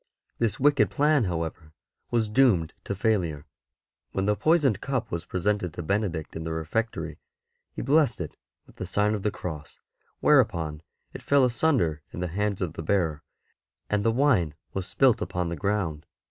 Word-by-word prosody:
This 115 -2 0
wicked 140 -7 +4
plan, 145 +4 +3
however, 80 -2 -4 0.4
was 115 -2 +1
doomed 105 -9 +3
to 100 - -2
failure. 90 -8 0 0.7
When 95 - 0
the 105 +1 +2
poisoned 145 - +2
cup 130 -4 -2
was 85 0 -3
presented 95 -2 -1
to 85 - -4
Benedict 90 -3 -2
in 80 - -4
the 80 - -4
refectory, 80 -1 -3 0.5
he - - -5
blessed 150 +1 +3
it 85 -4 -5 0.3
with - - -20
the 90 - -5
sign 105 +3 +2
of 105 - -2
the 105 - +1
Cross, 80 -7 -7 0.4
whereupon 75 -2 +3 0.3
it - - -8
fell 140 -2 +4
asunder 120 - +1
in - - -7
the 90 -1 -2
hands 100 +2 -1
of 85 -3 -3
the 80 - -6
bearer 80 -3 0 0.7
and 105 -1 +1
the 115 - +3
wine 115 - +2 0.2
was 95 -1 -3
spilt 130 -4 +3
upon 90 -1 -2
the 85 - -3
ground. 85 -4 -2
95 Hz, 170 wpm, -26 LUFS, 80-115 Hz, 0.7 s, wicked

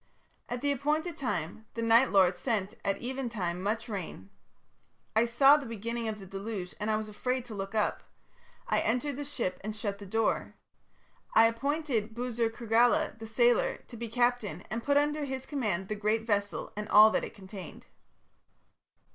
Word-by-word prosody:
"At 245 0 -3
the 285 - +1
appointed 300 +5 0
time 210 - -3
the 230 - -2
Night 230 +3 +5
Lord 185 -2 +4
sent 210 -3 -1
at 195 - 0
even 260 0 -4
time 180 -6 -3
much 220 +4 -1
rain. 180 - -6 0.8
I 225 +2 +5
saw 270 +5 +6
the 285 -4 -6
beginning 230 +1 -3
of 215 -1 -3
the 195 - -10
deluge 195 -1 -5
and 210 +1 -2
I 215 - +3
was 215 0 -3
afraid 250 +4 -2
to 235 - -8
look 195 +1 -5
up. 210 - +1 0.7
I - - +2
entered 250 +5 0
the 290 - -4
ship 245 -11 -3
and 215 +1 -4
shut 205 -2 -3
the 200 - -9
door. 225 +3 0 0.8
I 225 - +8
appointed 230 -2 -1
Buzur 235 -1 -1
Kurgala, 235 +5 +2
the 225 - -7
sailor, 240 +2 +3
to 240 - -9
be 235 +1 -5
captain, 235 -7 0
and 230 +2 -2
put 285 0 +3
under 295 +1 +1
his 265 -1 -4
command 210 - -2
the 215 - -2
great 215 +2 0
vessel 205 -2 -1
and 210 +1 -5
all 215 +1 +8
that - - 0
it - - -7
contained. 190 -3 -10
225 Hz, 180 wpm, -30 LUFS, 205-250 Hz, 0.8 s, I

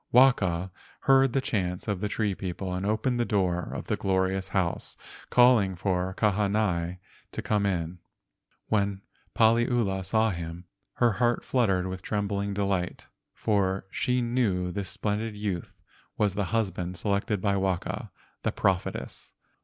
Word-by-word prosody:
Waka 95 -9 +4 0.3
heard 135 -1 +5
the 135 - +2
chants 95 -10 -2
of 100 -4 -1
the 105 - -1
tree 105 -1 0
people 95 0 -4
and 95 +2 -2
opened 110 +4 +1
the - - +3
door 90 -6 0
of - - -5
the - - 0
glorious 95 0 0
house, 95 -3 -1 0.3
calling 120 -6 +5
for 90 0 -1
Kahanai 100 -4 +1 0.3
to - - -4
come 105 -2 +1
in. 85 -2 -2 0.7
When 100 -2 0 0.3
Paliula 115 -4 +3
saw 110 +3 +2
him, 85 0 -6 0.3
her 120 -1 +3
heart 120 +3 +1
fluttered 95 -8 +2
with 95 0 -4
trembling 100 0 -1
delight, 95 -3 -1 0.3
for 95 -3 +1
she 125 -1 +1
knew 105 -7 0
this 100 -1 -3
splendid 105 +4 -2
youth 100 -4 -4 0.4
was 105 -3 +2
the 100 0 -1
husband 95 -3 -1
selected 100 0 0
by 100 +1 +1
Waka, 95 -2 -1 0.3
the - - 0
prophetess. - - -2
100 Hz, 140 wpm, -28 LUFS, 95-110 Hz, 0.7 s, heard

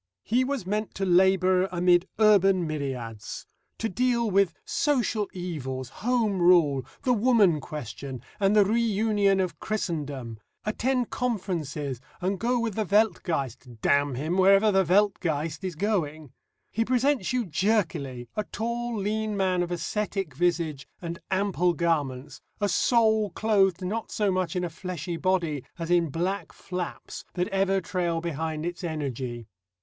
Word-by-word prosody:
He 245 +4 +2
was 265 -6 -2
meant 210 +3 -2
to 195 - -1
labour 185 0 +4
amid 175 0 +3
Urban 195 -4 +5
Myriads, 130 -8 -5 0.3
to 225 - -1
deal 235 +2 +1
with 195 -3 +3
Social 240 -7 0
Evils, 135 -8 -5
Home 225 -5 +1
Rule, 165 -7 +5 0.2
the 255 -3 +3
Woman 215 -8 +4
Question, 135 -3 -7 0.2
and 200 +1 +3
the 205 -2 +6
Reunion 210 -2 +2
of 175 -5 -2
Christendom, 145 - -3 0.3
attend 250 +3 0
Conferences 160 - -2 0.2
and 185 +1 -1
go 245 +1 +1
with 230 -2 -1
the 215 - 0
Weltgeist 160 - 0
damn 140 -1 +3
him! 160 +8 -1
wherever 195 +3 +6
the 190 -1 +4
Weltgeist 175 -4 +1
is 185 -3 -3
going. 155 - -1 0.4
He 225 - +1
presents 255 -2 +1
you 250 -2 0
jerkily 155 - -1
a 215 - -1
tall 235 +1 -3
lean 210 +1 -1
man 185 -2 +1
of 175 - -2
ascetic 190 0 -2
visage 165 -3 0
and 170 -1 -6
ample 190 -2 +1
garments, 145 -5 -1 0.2
a 205 -1 +1
soul 220 +1 +3
clothed 195 -2 +2
not 220 +4 -3
so 205 -2 +1
much 185 0 -1
in 180 - 0
a 175 - -2
fleshy 175 -1 -5
body 170 -7 0
as 165 0 -4
in 170 -2 +3
black 180 +7 -2
flaps 180 -2 -6
that 180 0 0
ever 195 -1 +2
trail 170 -2 -1
behind 160 -1 -3
its 175 +1 -4
energy. 130 -7 -4
185 Hz, 145 wpm, -27 LUFS, 160-210 Hz, 0.4 s, the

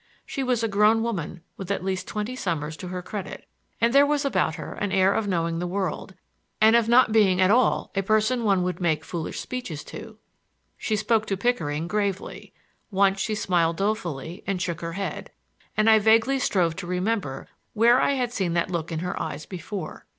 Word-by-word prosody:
She 275 - -4
was 250 -3 0
a - - +2
grown 210 +2 +3
woman 180 -7 -4
with 190 -2 -7
at 200 - -1
least 190 -1 -2
twenty 215 +4 -4
summers 160 - -3
to 180 - -7
her 180 0 -5
credit, 200 +1 -7 0.3
and 230 +1 +2
there 280 +1 +7
was 285 0 +1
about 215 - +1
her - - -7
an 205 -2 -3
air 190 +1 +4
of 220 - -1
knowing 165 -3 -1
the 175 - -2
world, 185 0 -3 0.4
and 220 +1 +6
of 230 -1 +3
not 240 -1 +5
being 200 -4 +4
at 185 +1 +4
all 245 +1 +2
a 195 - +2
person 215 +4 +1
one 195 -4 +2
would 180 0 -3
make 155 -3 0
foolish 165 -3 -4
speeches 245 -13 -5
to. 220 -1 -10 0.6
She 220 - -2
spoke 220 +1 +1
to 195 - -1
Pickering 165 -9 -1
gravely. 200 0 -3 0.4
Once 195 -1 +2
she 215 +2 -1
smiled 170 -5 +1
dolefully 180 -5 -3
and 195 -2 -1
shook 170 -2 -3
her 165 0 -4
head, 195 +2 -4 0.5
and 215 +1 +3
I 220 -1 +7
vaguely 225 +5 +3
strove 175 -9 +1
to 180 -3 -6
remember 180 -6 -2 0.3
where 235 +4 +5
I - - +2
had 250 -3 -1
seen 185 -6 -1
that 170 +2 0
look 170 -1 -3
in 160 -1 -3
her 180 - -3
eyes 150 -1 -5
before. 195 +2 -7
195 Hz, 200 wpm, -25 LUFS, 175-225 Hz, 0.6 s, there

